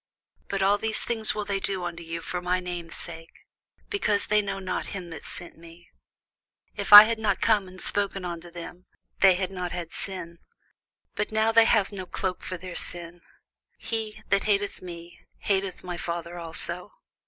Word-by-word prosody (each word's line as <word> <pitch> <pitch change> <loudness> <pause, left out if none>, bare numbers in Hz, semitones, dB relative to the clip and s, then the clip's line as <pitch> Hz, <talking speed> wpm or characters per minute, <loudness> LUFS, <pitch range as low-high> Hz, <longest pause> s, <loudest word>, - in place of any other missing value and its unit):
But 195 -1 -1
all 200 +1 +3
these 220 0 +2
things 220 -2 +2
will 210 -1 -2
they 200 -1 -1
do 195 -2 -2
unto 170 -1 -5
you 165 0 -5
for 180 +2 -4
my 180 +1 +1
name's 175 -2 -6
sake, 165 -1 -9 0.5
because 215 - +1
they 210 0 +3
know 195 -1 -4
not 185 -1 -3
him 175 -3 -8
that 160 - -8
sent 175 - -9
me. 170 +1 -15 0.8
If - - -4
I 205 0 +15
had 225 +1 -1
not 200 -4 +1
come 210 -4 +2
and 185 0 -12
spoken 200 -2 -2
unto 175 0 -6
them, 175 +1 -10 0.3
they 190 -1 +7
had 185 0 -2
not 180 -2 -4
had 175 -2 -5
sin: 170 -3 -5 0.7
but 210 +1 -2
now 220 +1 +2
they 225 0 +7
have 215 -3 +3
no 190 -2 -7
cloke 180 +1 -3
for 185 - -5
their 180 0 -8
sin. 175 0 -4 0.6
He 220 -1 -4
that 200 0 +2
hateth 205 -1 0
me 175 -1 -10 0.2
hateth 195 -2 -1
my 175 -1 -5
Father 170 0 -4
also. 170 +3 -2
185 Hz, 180 wpm, -26 LUFS, 175-205 Hz, 0.8 s, I